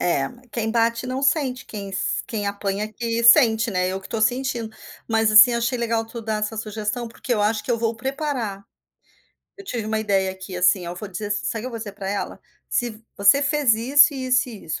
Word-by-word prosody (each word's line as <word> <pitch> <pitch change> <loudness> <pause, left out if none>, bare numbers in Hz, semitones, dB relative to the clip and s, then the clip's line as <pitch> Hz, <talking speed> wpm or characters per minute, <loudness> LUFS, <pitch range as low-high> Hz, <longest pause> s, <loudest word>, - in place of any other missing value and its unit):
É, 175 - +1 0.2
quem 225 -1 -2
bate 230 +1 +1
não 255 +2 -3
sente. 275 -3 +1
Quem 200 -2 -7
sen 190 - -1
quem 210 -3 -3
apanha 200 +1 -2
que 230 0 -2
sente, 230 -2 +6
né? 185 -2 0
Eu 190 +1 -3
que 190 - -11
estou 225 - -4
sentindo. 235 -1 -1 0.3
Mas, 225 -1 +2
assim, 220 +3 +8
eu 235 - 0
achei 235 +2 0
legal 230 -1 0
tu 230 +1 -8
dar 215 -1 -2
essa 210 +1 -3
sugestão. 215 +2 -3
Porque 245 +2 -5
eu 210 - 0
acho 215 +1 +1
que - - -5
eu 235 - +1
vou 230 0 0
preparar. 260 -6 -3 0.9
Eu 395 - -10
tive 230 - -4
uma 220 0 -1
ideia 195 -3 +1
aqui, 190 0 -9
assim, 180 0 +2
oh, 175 - -5
vou 205 +3 -7
dizer 195 +2 -5
ass 205 0 -1
sabe 225 - -2
o - - -9
que - - -5
eu - - -5
vou 230 - -6
dizer 215 -2 -7
pra 195 -1 -6
ela? 200 0 -3 0.3
“Se 230 -2 -2
você 205 +8 +5
fez 285 -4 +3
isso, 275 +7 +5
e 260 -1 -4
isso, 250 0 +2
e 220 -5 -10
isso”, 160 - -4
225 Hz, 235 wpm, -23 LUFS, 205-245 Hz, 0.9 s, assim